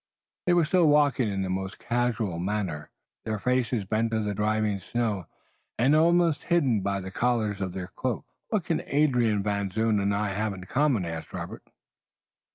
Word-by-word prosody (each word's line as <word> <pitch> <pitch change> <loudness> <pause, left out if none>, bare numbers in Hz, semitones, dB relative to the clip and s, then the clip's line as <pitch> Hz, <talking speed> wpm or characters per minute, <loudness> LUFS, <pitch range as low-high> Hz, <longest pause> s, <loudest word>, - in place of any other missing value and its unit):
They 175 - +5
were 170 -2 +4
still 170 0 +3
walking 145 -6 +3
in 95 -1 -1
the 95 - -3
most 95 +1 -3
casual 120 -7 -1
manner, 90 -5 -2 0.3
their 110 -1 -2
faces 125 -2 0
bent 110 +3 0
to 110 -1 0
the 105 -1 -1
driving 105 0 0
snow, 105 -2 -2 0.5
and 135 +6 +4
almost 170 0 +3
hidden 140 - +2
by 100 0 -1
the 95 0 -7
collars 110 -3 0
of 95 -2 -2
their 95 -1 -4
cloaks. - - -3 0.2
"What - - 0
can - - -1
Adrian 125 -8 +2
Van 100 -1 -1
Zoon 110 +1 +1
and 100 0 +1
I 105 0 0
have 105 +1 -1
in 90 - -9
common?" 130 -1 +1
asked 80 -1 -6
Robert. - - -7
110 Hz, 175 wpm, -27 LUFS, 100-125 Hz, 0.5 s, They